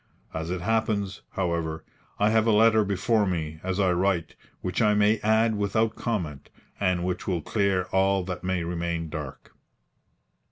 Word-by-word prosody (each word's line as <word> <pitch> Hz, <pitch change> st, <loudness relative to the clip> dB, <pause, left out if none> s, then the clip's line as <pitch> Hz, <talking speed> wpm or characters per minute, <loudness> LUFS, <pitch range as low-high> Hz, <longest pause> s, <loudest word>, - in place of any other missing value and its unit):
As 80 Hz, +1 st, -4 dB
it 90 Hz, -1 st, -3 dB
happens, 105 Hz, -1 st, -1 dB
however, 85 Hz, -4 st, -2 dB, 0.3 s
I 105 Hz, +1 st, +3 dB
have 110 Hz, 0 st, +3 dB
a -, -, +5 dB
letter 110 Hz, 0 st, +5 dB
before 100 Hz, +2 st, +1 dB
me 80 Hz, -3 st, -3 dB
as 95 Hz, +1 st, -2 dB
I 95 Hz, -2 st, +3 dB
write 90 Hz, -2 st, 0 dB, 0.3 s
which 90 Hz, +5 st, -2 dB
I 105 Hz, -1 st, +4 dB
may 105 Hz, +1 st, +3 dB
add 110 Hz, +1 st, +3 dB
without 110 Hz, +2 st, 0 dB
comment, 85 Hz, -, -3 dB, 0.3 s
and 90 Hz, -3 st, +1 dB
which 90 Hz, -1 st, -3 dB
will 90 Hz, -5 st, -1 dB
clear 100 Hz, -3 st, +1 dB
all 95 Hz, 0 st, +2 dB
that 90 Hz, 0 st, -5 dB
may 90 Hz, -1 st, -1 dB
remain 85 Hz, -1 st, -3 dB
dark. 75 Hz, -4 st, -7 dB
95 Hz, 160 wpm, -26 LUFS, 85-105 Hz, 0.3 s, a